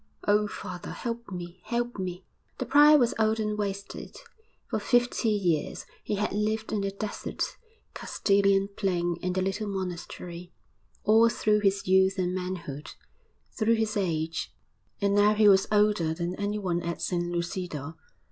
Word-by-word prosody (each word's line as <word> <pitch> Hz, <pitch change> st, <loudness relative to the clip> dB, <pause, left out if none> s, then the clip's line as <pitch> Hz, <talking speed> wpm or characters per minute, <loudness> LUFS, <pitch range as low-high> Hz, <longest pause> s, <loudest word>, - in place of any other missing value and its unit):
'Oh, 210 Hz, 0 st, +4 dB
father, 180 Hz, -3 st, -7 dB
help 235 Hz, -1 st, -5 dB
me! 175 Hz, -1 st, -7 dB
help 240 Hz, 0 st, -2 dB
me!' 180 Hz, 0 st, -4 dB, 0.3 s
The 255 Hz, -, -3 dB
prior 295 Hz, +4 st, +7 dB
was 240 Hz, -4 st, +3 dB
old 220 Hz, 0 st, +2 dB
and 210 Hz, -1 st, -1 dB
wasted; 200 Hz, -1 st, -5 dB, 0.5 s
for -, -, -1 dB
fifty 245 Hz, -2 st, +2 dB
years 180 Hz, -8 st, 0 dB, 0.2 s
he -, -, -1 dB
had 205 Hz, 0 st, -1 dB
lived 215 Hz, +1 st, -1 dB
in 210 Hz, -, 0 dB
the 195 Hz, -, -1 dB
desert 205 Hz, +2 st, -4 dB, 0.4 s
Castilian 195 Hz, -1 st, +2 dB
plain 175 Hz, -3 st, 0 dB
in 180 Hz, 0 st, -1 dB
the 185 Hz, 0 st, 0 dB
little 195 Hz, +3 st, -2 dB
monastery 180 Hz, -2 st, -6 dB, 0.5 s
all 225 Hz, +2 st, +6 dB
through 215 Hz, -2 st, +2 dB
his 195 Hz, -2 st, +1 dB
youth 190 Hz, +1 st, +4 dB
and 180 Hz, -1 st, 0 dB
manhood, 180 Hz, -6 st, -5 dB, 0.6 s
through 230 Hz, 0 st, +2 dB
his 220 Hz, -1 st, -1 dB
age; 165 Hz, -5 st, -1 dB, 0.5 s
and 200 Hz, -1 st, +1 dB
now 205 Hz, +1 st, +5 dB
he 210 Hz, 0 st, +5 dB
was 195 Hz, -1 st, +6 dB
older 205 Hz, -6 st, +3 dB
than 170 Hz, +1 st, -2 dB
anyone 200 Hz, -4 st, -1 dB
at 170 Hz, 0 st, -4 dB
San 175 Hz, -1 st, -1 dB
Lucido. 170 Hz, -3 st, -4 dB
195 Hz, 150 wpm, -28 LUFS, 180-215 Hz, 0.6 s, prior